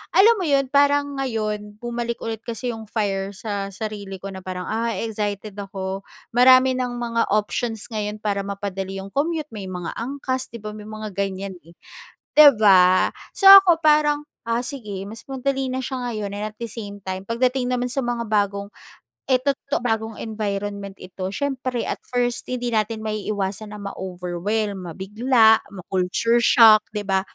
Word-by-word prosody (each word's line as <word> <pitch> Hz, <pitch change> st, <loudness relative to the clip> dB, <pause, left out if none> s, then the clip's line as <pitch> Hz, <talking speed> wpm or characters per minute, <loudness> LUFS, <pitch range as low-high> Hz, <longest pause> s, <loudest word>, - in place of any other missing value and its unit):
alam 440 Hz, +5 st, +7 dB
mo 370 Hz, -, -1 dB
'yon, 275 Hz, -2 st, +2 dB
parang 285 Hz, 0 st, +3 dB
ngayon 215 Hz, -5 st, -3 dB
bumalik 235 Hz, 0 st, -3 dB
ulit 225 Hz, -1 st, -3 dB
kasi 235 Hz, +1 st, -4 dB
'yung 225 Hz, -1 st, -8 dB
fire 200 Hz, -2 st, -2 dB
sa 200 Hz, -1 st, -4 dB
sarili 205 Hz, -1 st, -6 dB
ko 195 Hz, -, -6 dB
na 190 Hz, -, -7 dB
parang, 185 Hz, -1 st, -4 dB
"Ah 230 Hz, +1 st, -1 dB
excited 210 Hz, -1 st, -4 dB
ako 195 Hz, 0 st, -5 dB, 0.3 s
marami 255 Hz, +2 st, +6 dB
ng 250 Hz, -1 st, -2 dB
mga 230 Hz, -3 st, -1 dB
options 220 Hz, +1 st, -2 dB
ngayon 210 Hz, -1 st, -3 dB
para 200 Hz, -2 st, -1 dB
mapadali 195 Hz, -1 st, -4 dB
'yong 195 Hz, -, -9 dB
commute 305 Hz, +3 st, -1 dB
may 205 Hz, -3 st, -7 dB
mga 180 Hz, -2 st, -5 dB
angkas." 260 Hz, +1 st, -3 dB
'Di 235 Hz, -, -10 dB
ba, 210 Hz, -, -5 dB
may 210 Hz, 0 st, -10 dB
mga 215 Hz, 0 st, -6 dB
ganyan, 195 Hz, -1 st, -3 dB
eh. 170 Hz, -, -15 dB, 0.6 s
'Di 300 Hz, -1 st, +11 dB
ba? 185 Hz, -3 st, +5 dB, 0.3 s
So, 390 Hz, -, -1 dB
ako 380 Hz, -4 st, +8 dB
parang, 300 Hz, -1 st, +4 dB, 0.3 s
ah, 235 Hz, +2 st, 0 dB
sige 210 Hz, -8 st, -6 dB
mas 220 Hz, +3 st, -9 dB
madali 270 Hz, 0 st, -1 dB
na 255 Hz, -, -2 dB
siya 260 Hz, 0 st, -4 dB
ngayon, 210 Hz, -3 st, -4 dB
and 205 Hz, +1 st, -3 dB
at 215 Hz, -, -21 dB
the 235 Hz, -, -4 dB
same 205 Hz, -3 st, -7 dB
time 190 Hz, 0 st, -3 dB
pagdating 250 Hz, +2 st, +1 dB
naman 250 Hz, 0 st, 0 dB
sa 275 Hz, -, 0 dB
mga 240 Hz, -1 st, -2 dB
bagong 200 Hz, -1 st, -1 dB, 0.6 s
eh, 260 Hz, -, +5 dB
to 280 Hz, -, +3 dB, 0.2 s
to -, -, +2 dB
bagong 225 Hz, -2 st, -2 dB
environment 200 Hz, -2 st, -4 dB
ito. 185 Hz, 0 st, -6 dB
Siyempre 255 Hz, +2 st, -2 dB
at -, -, -4 dB
first, 245 Hz, -1 st, -1 dB
hindi 245 Hz, -1 st, -2 dB
natin 220 Hz, 0 st, -1 dB
maiiwasan 210 Hz, -1 st, -3 dB
na 210 Hz, -, -8 dB
ma-overwhelm, 190 Hz, 0 st, -3 dB
mabigla, 220 Hz, +5 st, +3 dB
ma-culture 190 Hz, +5 st, 0 dB
shock, 225 Hz, -3 st, +7 dB
'di 210 Hz, -1 st, -5 dB
ba? 190 Hz, -1 st, +2 dB
215 Hz, 170 wpm, -22 LUFS, 200-245 Hz, 0.6 s, Di